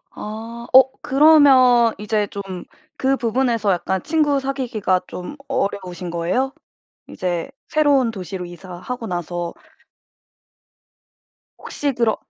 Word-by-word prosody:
아. 225 Hz, +2 st, -7 dB
어 260 Hz, 0 st, +8 dB
그러면 265 Hz, -5 st, +5 dB
이제 210 Hz, 0 st, -1 dB
좀 200 Hz, -, -6 dB, 0.5 s
그 270 Hz, +1 st, +1 dB
부분에서 230 Hz, -3 st, +1 dB
약간 185 Hz, +1 st, -1 dB
친구 295 Hz, -3 st, +1 dB
사귀기가 250 Hz, -9 st, -1 dB
좀 180 Hz, +11 st, -7 dB
어려우신 190 Hz, -8 st, -3 dB
거예요? 185 Hz, +11 st, -1 dB, 0.6 s
이제 175 Hz, -2 st, -3 dB, 0.2 s
새로운 285 Hz, -6 st, +3 dB
도시로 190 Hz, -3 st, -6 dB
이사하고 185 Hz, +7 st, -7 dB
나서 175 Hz, -2 st, -4 dB, 2.0 s
혹시 285 Hz, -1 st, -3 dB
그러 235 Hz, -3 st, +1 dB
230 Hz, 230 characters per minute, -21 LUFS, 185-265 Hz, 2.0 s, 어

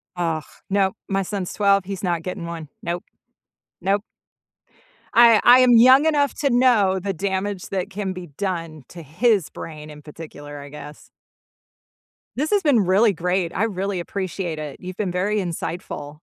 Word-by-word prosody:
Ugh, 165 Hz, -3 st, -1 dB, 0.3 s
nope, 195 Hz, -1 st, +1 dB
my 195 Hz, 0 st, 0 dB
son's 190 Hz, -1 st, -4 dB
12, 200 Hz, -2 st, +3 dB
he's 195 Hz, 0 st, -6 dB
not 170 Hz, -2 st, -1 dB
getting 180 Hz, -2 st, -5 dB
one. 165 Hz, -3 st, -7 dB
Nope. 175 Hz, +3 st, -3 dB, 0.8 s
Nope. 200 Hz, +3 st, 0 dB, 1.1 s
I 230 Hz, -2 st, +7 dB
I 245 Hz, +1 st, +8 dB
am 250 Hz, -1 st, +5 dB
young 255 Hz, +6 st, +7 dB
enough 290 Hz, -3 st, +2 dB
to 280 Hz, -, 0 dB
know 235 Hz, -7 st, +3 dB
the 195 Hz, +1 st, -3 dB
damage 190 Hz, +1 st, -3 dB
that 195 Hz, 0 st, -3 dB
can 195 Hz, -1 st, -4 dB
be 180 Hz, -1 st, -8 dB
done 165 Hz, -2 st, -5 dB
to 170 Hz, -, -10 dB
his 195 Hz, -, +1 dB
brain 155 Hz, -1 st, -9 dB
in 150 Hz, 0 st, -11 dB
particular, 145 Hz, -1 st, -10 dB
I 140 Hz, -, -10 dB
guess. 150 Hz, 0 st, -11 dB, 1.2 s
This 300 Hz, +7 st, -2 dB
has 410 Hz, -1 st, +3 dB
been 275 Hz, -8 st, +3 dB
really 200 Hz, +4 st, +4 dB
great. 180 Hz, 0 st, -1 dB
I 200 Hz, -, +1 dB
really 195 Hz, -3 st, -2 dB
appreciate 180 Hz, -3 st, -4 dB
it. 150 Hz, -2 st, -7 dB
You've 185 Hz, 0 st, -8 dB
been 195 Hz, -4 st, -2 dB
very 200 Hz, +4 st, 0 dB
insightful. 165 Hz, -4 st, -5 dB
190 Hz, 165 wpm, -22 LUFS, 165-205 Hz, 1.2 s, I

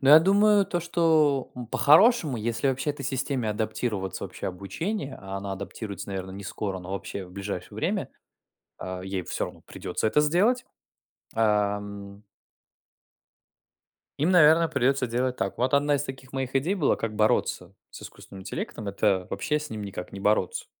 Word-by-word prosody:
Да, 135 Hz, +1 st, +4 dB
я -, -, +11 dB
думаю, 205 Hz, +2 st, +4 dB
то 175 Hz, -, -1 dB
что, 160 Hz, -5 st, +2 dB
ну, 125 Hz, -1 st, -7 dB
по-хорошему, 155 Hz, -, +5 dB
если 115 Hz, +4 st, -1 dB
вообще 135 Hz, +3 st, 0 dB
этой 140 Hz, -1 st, -6 dB
системе 130 Hz, -3 st, -1 dB
адаптироваться 105 Hz, -2 st, -2 dB
вообще -, -, -6 dB
обучения, 135 Hz, -, -4 dB
а 95 Hz, 0 st, -6 dB
она 100 Hz, 0 st, -5 dB
адаптируется, 100 Hz, 0 st, -6 dB
наверно, 95 Hz, -1 st, -4 dB
не 100 Hz, +1 st, -8 dB
скоро, 95 Hz, -1 st, -3 dB
но 90 Hz, +2 st, -7 dB
вообще 100 Hz, 0 st, -5 dB
в 90 Hz, -, -14 dB
ближайшее 100 Hz, -2 st, -5 dB
время, -, -, -1 dB, 0.7 s
а, 95 Hz, 0 st, -5 dB
ей 95 Hz, -1 st, -3 dB
всё -, -, -2 dB
равно -, -, -11 dB
придется 110 Hz, -, -2 dB
это 150 Hz, +7 st, +3 dB
сделать, 195 Hz, +12 st, +2 dB, 0.7 s
ам 105 Hz, -2 st, -1 dB, 2.0 s
им, 155 Hz, +5 st, +2 dB
наверное, 165 Hz, -1 st, +6 dB
придется 135 Hz, -2 st, +1 dB
делать 125 Hz, +2 st, -1 dB
так. 95 Hz, -, -3 dB
Вот 130 Hz, +3 st, +2 dB
1 145 Hz, +1 st, +3 dB
из 140 Hz, -, -1 dB
таких 130 Hz, -1 st, -9 dB
моих 135 Hz, 0 st, -3 dB
идей 165 Hz, +9 st, +1 dB
была: 160 Hz, -8 st, +2 dB
как 115 Hz, -1 st, -3 dB
бороться 105 Hz, +1 st, +1 dB, 0.2 s
с -, -, -11 dB
искусственным 95 Hz, -1 st, -11 dB
интеллектом- 105 Hz, +2 st, -5 dB
это 100 Hz, -2 st, +1 dB
вообще 150 Hz, +10 st, 0 dB
с 150 Hz, -, -7 dB
ним 110 Hz, -2 st, -5 dB
никак 95 Hz, -2 st, -6 dB
не 100 Hz, -, -7 dB
бороться. 105 Hz, -3 st, +1 dB
120 Hz, 165 wpm, -26 LUFS, 100-150 Hz, 2.0 s, я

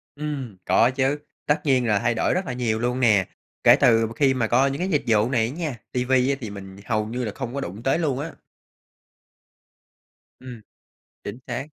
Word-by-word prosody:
Ừm, 145 Hz, -8 st, -5 dB
có 115 Hz, +7 st, +4 dB
chứ, 135 Hz, +2 st, 0 dB, 0.3 s
tất 145 Hz, -, +1 dB
nhiên 130 Hz, -4 st, +2 dB
là 105 Hz, -2 st, +2 dB
thay 120 Hz, +2 st, +1 dB
đổi -, -, +1 dB
rất 185 Hz, +2 st, -1 dB
là 135 Hz, -, -4 dB
nhiều 115 Hz, -3 st, -1 dB
luôn 125 Hz, +2 st, -1 dB
nè, 110 Hz, -7 st, +4 dB, 0.4 s
kể -, -, +8 dB
từ 115 Hz, 0 st, +4 dB
mà 115 Hz, -, -9 dB
khi 135 Hz, -2 st, +3 dB
mà 120 Hz, -4 st, 0 dB
có 130 Hz, +4 st, +3 dB
những 140 Hz, +2 st, -3 dB
cái 185 Hz, +2 st, -1 dB
dịch 150 Hz, -6 st, +1 dB
vụ 110 Hz, 0 st, +3 dB
này 120 Hz, -4 st, +2 dB
á -, -, -5 dB
nha, 155 Hz, -5 st, -3 dB, 0.2 s
ti 125 Hz, 0 st, -1 dB
vi 130 Hz, 0 st, +2 dB
á 140 Hz, -, +2 dB
thì 110 Hz, -, -5 dB
mình 95 Hz, -1 st, -10 dB
hầu 110 Hz, -2 st, 0 dB
như 120 Hz, +3 st, -3 dB
là 105 Hz, -, -3 dB
không 125 Hz, -2 st, -5 dB
có 140 Hz, -, -3 dB
đụng 100 Hz, 0 st, -7 dB
tới 135 Hz, +5 st, +1 dB
luôn 145 Hz, -6 st, -1 dB
á. 165 Hz, +3 st, -4 dB, 2.1 s
Ừm, 125 Hz, -3 st, -10 dB, 0.6 s
chính 105 Hz, +4 st, -6 dB
xác. 125 Hz, +1 st, -4 dB
125 Hz, 220 wpm, -23 LUFS, 115-135 Hz, 2.1 s, kể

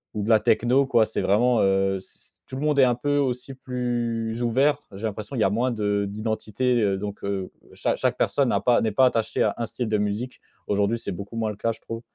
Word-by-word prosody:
ou 105 Hz, -, -2 dB
de 105 Hz, -, -3 dB
la 110 Hz, -2 st, +6 dB
techno, 125 Hz, +6 st, +2 dB
quoi. 115 Hz, -4 st, +4 dB
C'est 110 Hz, -, -3 dB
vraiment, 120 Hz, +4 st, +3 dB
heu, 95 Hz, 0 st, +2 dB
c -, -, -19 dB, 0.2 s
tout 130 Hz, -, -8 dB
le 135 Hz, -, -4 dB
monde 150 Hz, -2 st, +2 dB
est 135 Hz, -, +8 dB
un 125 Hz, -1 st, +3 dB
peu 145 Hz, +4 st, 0 dB
aussi 135 Hz, -1 st, -1 dB
plus 120 Hz, -3 st, -3 dB
ouvert, 130 Hz, +5 st, +2 dB
j'ai 100 Hz, +3 st, -10 dB
l'impression. 110 Hz, +4 st, -5 dB
Il 120 Hz, -, -2 dB
y -, -, +3 dB
a 95 Hz, -, +2 dB
moins 120 Hz, +5 st, +1 dB
de 105 Hz, -3 st, 0 dB
d'identités. 110 Hz, +3 st, -1 dB
Heu, 100 Hz, -2 st, +1 dB
donc, 100 Hz, +1 st, -6 dB
heu, 100 Hz, -2 st, -3 dB, 0.2 s
cha -, -, -1 dB
chaque -, -, 0 dB
personne 135 Hz, -4 st, +1 dB
n'a -, -, +2 dB
pas 120 Hz, -1 st, +3 dB
n'est 110 Hz, -, 0 dB
pas 130 Hz, +5 st, +4 dB
attachée 115 Hz, -3 st, +1 dB
à -, -, +1 dB
1 115 Hz, -, -2 dB
style 120 Hz, +1 st, -4 dB
de 105 Hz, -1 st, +1 dB
musique. 105 Hz, +5 st, -3 dB, 0.2 s
Aujourd'hui, 105 Hz, +3 st, +1 dB
c'est 115 Hz, -, -5 dB
beaucoup 100 Hz, +5 st, -7 dB
moins 110 Hz, -1 st, -1 dB
le 105 Hz, -, -8 dB
cas, 115 Hz, +2 st, 0 dB
je -, -, -17 dB
trouve. 115 Hz, 0 st, -7 dB
115 Hz, 245 wpm, -24 LUFS, 105-125 Hz, 0.2 s, est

